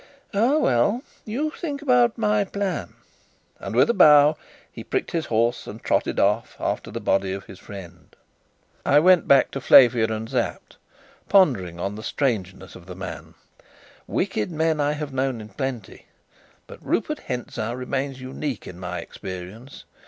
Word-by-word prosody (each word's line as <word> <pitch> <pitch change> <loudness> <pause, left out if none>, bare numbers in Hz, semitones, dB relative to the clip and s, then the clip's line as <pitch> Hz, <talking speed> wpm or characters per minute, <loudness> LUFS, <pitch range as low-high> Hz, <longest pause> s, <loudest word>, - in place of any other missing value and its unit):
Ah, 235 +9 +3
well, 205 - +2 0.2
you 280 +8 -2
think 295 -4 -5
about 245 -4 +3
my 210 -2 +2
plan," 200 -1 -4 0.6
and, - - -6
with - - +5
a 235 - +2
bow, 150 -5 +7 0.4
he - - -9
pricked 390 - -2
his 165 -3 -2
horse 115 +2 0
and - - -9
trotted - - 0
after - - -1
the - - -5
body 95 -1 0
of 100 0 -6
his 95 - -13
friend. 95 -4 -12 0.7
I 145 - +5
went 180 +1 +5
back 140 -1 +5
to 135 - -5
Flavia 120 -3 +6
and 110 0 -4
Sapt, 125 -1 -3 0.5
pondering 100 - +3
on 100 +3 -2
the 105 - -8
strangeness 95 -8 -2
of 90 -1 -14
the 90 - -8
man. 95 0 -8 0.7
Wicked 105 - -1
men 160 -1 0
I 145 0 +1
have 150 -2 -5
known 130 -2 -1
in 110 0 -10
plenty, 120 0 -6 0.6
but - - -13
Rupert - - -1
Hentzau 120 -2 -4
remains 130 +1 -3
unique 130 -1 -5
in 90 - -10
my 90 - -5
experience. 95 +8 -9
130 Hz, 155 wpm, -23 LUFS, 105-170 Hz, 0.7 s, bow